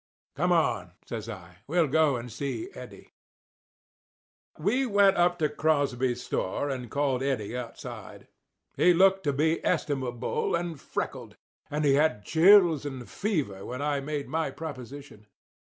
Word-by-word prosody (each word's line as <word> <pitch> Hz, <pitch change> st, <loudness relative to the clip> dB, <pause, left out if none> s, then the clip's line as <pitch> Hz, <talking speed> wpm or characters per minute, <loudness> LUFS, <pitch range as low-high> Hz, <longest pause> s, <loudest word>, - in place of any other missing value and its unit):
"Come 175 Hz, +6 st, +1 dB
on," 105 Hz, -, +1 dB
says 115 Hz, -1 st, -6 dB
I. 90 Hz, -6 st, -10 dB
"We'll 165 Hz, +3 st, +3 dB
go 150 Hz, -1 st, +3 dB
and 120 Hz, 0 st, -6 dB
see 140 Hz, -, -4 dB
Eddie." -, -, -12 dB, 1.4 s
We 250 Hz, +6 st, +1 dB
went 200 Hz, -2 st, +4 dB
up 175 Hz, 0 st, +3 dB
to 155 Hz, -3 st, +2 dB
Crosby's 135 Hz, -6 st, 0 dB
store 140 Hz, +9 st, -2 dB
and 125 Hz, -3 st, -5 dB
called 140 Hz, -2 st, 0 dB
Eddie 125 Hz, -5 st, -2 dB
outside. 125 Hz, -2 st, -8 dB, 0.5 s
He 180 Hz, -1 st, +4 dB
looked 190 Hz, +2 st, +4 dB
to 145 Hz, -, +2 dB
be 160 Hz, +4 st, +1 dB
estimable 135 Hz, -8 st, -1 dB
and 170 Hz, -4 st, -4 dB
freckled; -, -, -5 dB, 0.3 s
and 150 Hz, +1 st, -1 dB
he 140 Hz, -, +5 dB
had 145 Hz, -7 st, +2 dB
chills 170 Hz, -3 st, +6 dB
and 130 Hz, -4 st, -6 dB
fever 150 Hz, -, -2 dB
when 130 Hz, +3 st, -5 dB
I 145 Hz, -1 st, 0 dB
made 145 Hz, 0 st, -4 dB
my 160 Hz, -2 st, -1 dB
proposition. 135 Hz, -5 st, -9 dB
145 Hz, 140 wpm, -28 LUFS, 125-165 Hz, 1.4 s, chills